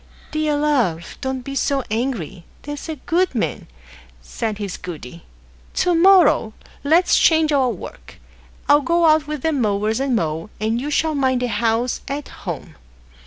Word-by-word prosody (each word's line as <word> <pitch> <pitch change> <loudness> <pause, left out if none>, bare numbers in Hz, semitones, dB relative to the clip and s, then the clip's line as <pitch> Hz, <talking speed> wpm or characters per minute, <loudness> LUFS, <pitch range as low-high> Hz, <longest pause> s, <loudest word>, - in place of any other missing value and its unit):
"Dear 310 -1 0
love, 245 - 0
don't 265 -1 -3
be 275 - -6
so 275 0 0
angry; 215 - -3 0.2
there's 290 +2 -7
a 315 - -3
good 340 +2 0
man," 225 - -2 0.5
said 210 - -4
his 200 -3 -4
goody; 170 -3 -9 0.5
"to 355 - +2
morrow 345 - +5 0.3
let's 325 +5 +4
change 320 -1 +4
our 270 -3 +3
work. - - -9 0.5
I'll 290 +1 +5
go 335 +3 +2
out 310 -1 +4
with 300 -3 -5
the 320 - +2
mowers 215 -4 0
and 270 -2 0
mow, 165 -1 -2
and 220 +3 -1
you 290 - -3
shall 315 +1 +1
mind 260 -3 +1
the 245 - -1
house 235 +1 0
at 280 +1 -4
home." - - -7
265 Hz, 160 wpm, -20 LUFS, 220-300 Hz, 0.5 s, morrow